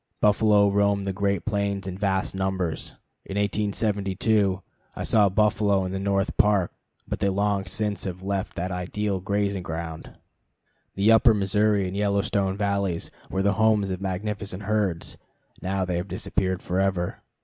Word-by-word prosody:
Buffalo 105 -1 +4
roamed 100 0 +2
the 100 - -1
great 100 0 0
plains 100 -2 -1
in 95 -1 -4
vast 95 -1 0
numbers. 95 -4 -2 0.3
In 95 - -6
1872 100 -1 0 0.3
I - - -4
saw 105 -3 +4
buffalo 100 -1 +2
in 90 - -3
the 95 - -3
North 100 0 0
Park, 100 -4 +3 0.3
but - - -3
they 100 - +2
long 100 0 0
since 105 +1 -2
left 95 +1 -3
that 90 +2 -3
ideal 95 +2 -2
grazing 100 0 -1
ground. 80 -1 -6 0.8
The 100 +3 +4
Upper 115 0 +6
Missouri 105 0 +2
and 90 - -5
Yellowstone 100 -1 0
valleys 100 -4 -1 0.2
were 95 0 -1
the 100 +1 +3
homes 105 -3 +3
of 90 0 -4
magnificent 100 +1 -3
herds; 100 -5 -1 0.4
now 95 0 -1
they 90 -1 -1
have 90 +3 -3
disappeared 95 0 -2
forever. 95 -1 -1
100 Hz, 150 wpm, -25 LUFS, 95-105 Hz, 0.8 s, Upper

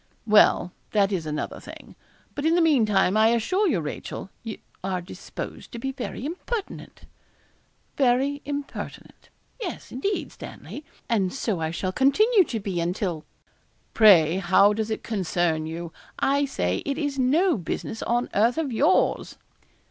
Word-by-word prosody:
'Well, 210 -4 +5 0.2
that 205 -2 +3
is 170 -5 -2
another 150 0 -4
thing; - - -12 0.4
but 285 - -5
in 325 +2 +3
the - - +3
meantime, 215 - +3
I 220 +1 +5
assure 300 - +2
you, 255 - +1
Rachel, 150 +5 -6
you 225 -2 -6 0.3
are 190 -1 -1
disposed 175 +2 -8
to - - -5
be 270 +3 -3
very 260 0 -6
impertinent.' 385 +7 -5 0.9
'Very 275 +2 +2
impertinent; 285 0 -7 0.3
yes, 360 -7 -6
indeed, 390 +11 -2
Stanley, 300 - -9 0.2
and 200 -6 +1
so 220 -9 -2
I 160 - -1
shall 185 +3 -2
continue 385 - +4
to 230 - -3
be 195 -4 -3
until 175 -2 -2 0.3
' - - -41
'Pray 180 -6 +6
how 195 +2 +4
does 220 +1 -2
it 220 - -3
concern 175 -6 -1
you? 165 +1 -6 0.2
I 280 +1 +2
say 90 - -1
it 275 - -2
is 290 -3 -2
no 315 +8 +3
business 200 +4 -4
on 240 +1 0
earth 230 +6 +3
of 310 -5 -1
yours.' 300 +11 +2
225 Hz, 150 wpm, -25 LUFS, 185-285 Hz, 0.9 s, Pray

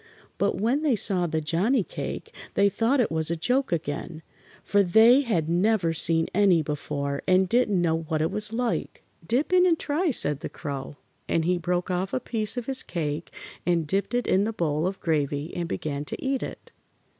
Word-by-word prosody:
But 200 -2 0
when 240 +8 +1
they 295 -6 +2
saw 185 -4 +2
the 160 -1 -1
Johnnie 190 - +1
cake - - -6 0.2
they 200 0 +4
thought 230 +7 +1
it 240 - +1
was 160 -1 0
a 170 - 0
joke 250 +10 0
again, 160 0 -4 0.4
for 205 +1 +3
they 220 +8 +6
had 185 - -1
never 180 0 +2
seen 165 0 +3
any 185 -5 +4
before 145 -1 -3
and 185 0 +4
didn't 215 -3 +2
know 165 -2 +1
what 155 -1 -1
it 160 +3 0
was 210 +1 0
like. 235 0 -2 0.2
"Dip 250 - 0
in 365 0 +6
and 335 -2 +3
try," 315 +5 -1
said 150 - +2
the - - -6
Crow, 140 0 -6 0.3
and 165 -1 +1
he 180 0 +1
broke 180 +2 -1
off 185 +2 -2
a - - +1
piece 225 -2 -2
of 245 - -3
his 270 +1 0
cake 155 -1 -4 0.3
and 170 -2 +1
dipped 195 +9 -1
it 245 - 0
in 190 +2 +2
the 225 +2 -2
bowl 155 -3 0
of 190 +1 -4
gravy 150 -1 -1
and 170 -1 -3
began 145 -2 -3
to - - -5
eat 270 -1 -1
it. - - -8
180 Hz, 200 wpm, -26 LUFS, 160-225 Hz, 0.4 s, they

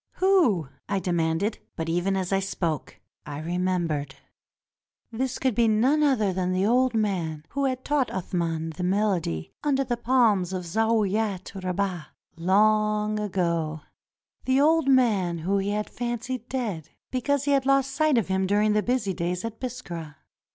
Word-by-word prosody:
"Who?" 330 - +3 0.2
I 200 - +1
demanded; 175 +3 0 0.2
but 160 - -3
even 175 +4 0
as 190 0 -2
I 195 - +3
spoke, 170 -5 -3 0.2
I 145 -1 -6
remem 180 +2 -1
bered. 145 -3 -3 1.0
This 255 +3 -2
could 260 -2 0
be 235 +1 +3
none 250 +8 +3
other 235 -10 +2
than 185 0 -1
the 185 +1 +1
old 250 +2 +3
man 175 -8 -1
who 280 0 -1
had 260 -1 -2
taught 285 -4 +1
Athman 165 -3 -2
the 180 - -3
melody 180 - 0
under 275 -2 +2
the 240 -2 -2
palms 225 -7 +2
of 185 -1 -3
Zaouiat 215 0 0
Ribah, 185 -3 -2 0.3
long 210 +3 +2
ago 170 -6 -1 0.3
— - - -38
the 260 +1 +3
old 320 +1 +4
man 215 -10 +3
whom 190 +5 0
he 195 +1 -1
had 210 +1 -1
fancied 240 +1 -4
dead, 215 - -3 0.2
because 270 +2 0
he 285 - 0
had 275 -1 +2
lost 275 0 +3
sight 305 -1 +2
of 225 - +1
him 190 0 0
during 210 +2 +3
the 210 - +3
busy 235 -4 0
days 180 +2 -2
at 225 -1 -6
Biskra. 175 - -6
205 Hz, 165 wpm, -26 LUFS, 180-250 Hz, 1.0 s, old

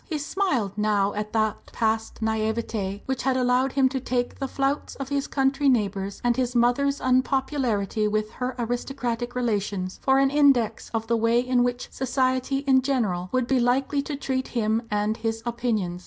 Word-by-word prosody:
He 315 - -3
smiled 290 - -1
now 205 -1 +2
at 210 0 -4
that 220 -1 0
past 225 0 -1
naïveté 220 -2 -1
which 265 -1 -2
had 260 0 +1
allowed 255 +1 +2
him 270 -1 +4
to 265 0 -2
take 245 -1 -2
the 270 - -2
flouts 275 +2 -1
of 275 -1 -6
his 280 0 -1
country 275 +1 +2
neighbours 200 -5 0
and 240 -1 +2
his 250 -1 -1
mother's 260 +4 +2
unpopularity 255 -5 +1
with 215 0 -1
her 255 0 -4
aristocratic 245 0 -3
relations 205 -6 -2
for 265 0 +3
an 270 0 +3
index 270 -7 +3
of 225 -1 -2
the 230 +1 +1
way 230 +1 +3
in 250 0 +2
which 245 0 -2
"society" 260 +1 0
in 265 -1 +5
general 215 -10 -1
would 255 -1 +1
be 260 +1 +2
likely 260 +4 +1
to 285 +1 -5
treat 265 -2 -2
him 220 -1 0
and 210 +1 0
his 225 0 -3
opinions. 225 -7 -1
245 Hz, 175 wpm, -25 LUFS, 220-265 Hz, -, in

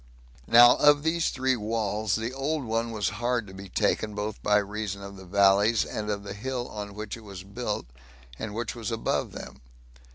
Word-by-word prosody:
Now, 120 +1 +8
of 145 0 +5
these 165 +1 +1
three 130 0 +1
walls, 110 -2 -1
the 115 +3 -3
old 140 +3 -1
one 115 +1 -1
was 110 -3 -1
hard 120 -1 +1
to 95 - -12
be 95 0 -9
taken, 105 +3 0
both 105 0 -4
by 105 0 +4
reason 100 -1 -3
of 100 0 -8
the 95 -1 -11
valleys, 100 +3 +4
and 105 -1 -4
of 100 -1 -2
that 100 0 -7
hill 125 +2 -3
on 105 -1 -7
which 105 0 -5
it 115 - -13
was 100 -3 -9
built, 105 +2 -4 0.5
and 105 -1 -5
which 115 0 -3
was 115 -1 -5
above 115 -1 -1
them. - - -9
110 Hz, 195 wpm, -27 LUFS, 100-120 Hz, 0.5 s, Now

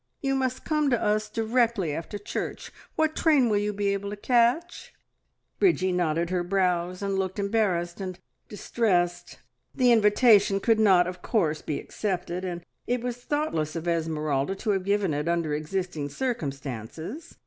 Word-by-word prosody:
You 270 -1 -1
must 260 -1 -1
come 305 -2 +1
to 240 -3 +2
us 215 0 0
directly 225 - +1
after 165 +7 -5
church. 205 - -5 0.2
What 315 0 +1
train 290 -7 +3
will 205 -1 +2
you 210 0 -1
be 205 0 -1
able 200 0 -2
to 205 - -5
catch?" 245 +10 +1 0.6
Bridgie 190 - +3
knitted 170 -1 0
her 180 -1 0
brows 180 0 0
and 195 -1 -1
looked 190 0 -2
embarrassed 200 -4 0
and 185 -2 -5 0.3
distressed. 185 -5 -1 0.4
The 250 -3 +4
invitation 210 -2 +5
could 225 +2 +2
not, 190 -5 +5
of 180 0 -6
course, 160 -10 0
be 150 - -3
accepted, 180 -3 -3
and 175 -2 -5 0.2
it 245 -1 -1
was 245 -1 -3
thoughtless 245 - -2
of 165 +1 -4
Esmeralda 155 -1 -1
to 210 +2 -1
have 190 -2 -1
given 200 -4 +1
it 150 +2 -2
under 170 -3 0
existing 155 -1 -3
circumstances. 150 - -5
195 Hz, 160 wpm, -26 LUFS, 170-230 Hz, 0.6 s, invitation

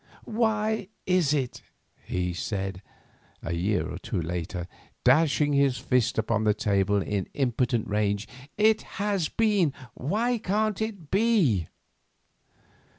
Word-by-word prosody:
"Why 220 -2 0 0.2
is 180 -6 +3
it?" 135 -5 -1 0.5
he 90 -1 -1
said, 95 0 -3 0.6
a 85 - -2
year 90 +4 0
or 85 - -6
two 95 - -3
later, 85 +1 -3 0.4
dashing 145 +1 +4
his 140 -2 +3
fist 125 -3 +1
upon 110 -1 +1
the 105 -1 +3
table 100 -1 +2
in 100 -2 -2
impotent 125 -3 0
rage. 105 0 0 0.3
"It 215 +1 +4 0.2
has 200 -5 0
been; 205 -9 +2 0.2
why 225 - 0
can't 215 +1 0
it 200 -9 -4
be?" 190 - +3
130 Hz, 120 wpm, -27 LUFS, -, 0.6 s, dashing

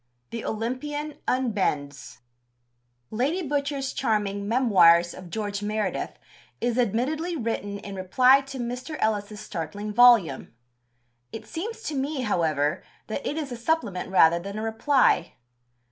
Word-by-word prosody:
(2) 235 - -4
THE - - -7
OLYMPIAN 290 +7 -4
UNBENDS 150 - -1 0.9
Lady 295 +9 -1
Butcher's 280 -1 -2
charming 205 -4 -1
Memoirs 185 -8 +5
of 185 -1 -10
George 205 0 -3
Meredith 210 +1 -2 0.4
is 240 +1 0
admittedly 270 - 0
written 210 -5 -3
in 200 0 -8
reply 250 +9 +4
to 275 - -7
Mr. 250 +5 -5
Ellis's 210 -1 -1
startling 205 +3 -5
volume. 210 - +5 0.8
It 225 - -8
seems 450 +7 -6
to 310 - -3
me, 280 0 -2
however, 160 - 0 0.2
that 220 +6 -4
it 295 - -3
is 295 -4 -4
a - - -3
supplement 230 - -1
rather 170 -3 +5
than 200 +4 -7
a 215 - -3
reply. 225 - +2
225 Hz, 130 wpm, -26 LUFS, 200-270 Hz, 0.9 s, Memoirs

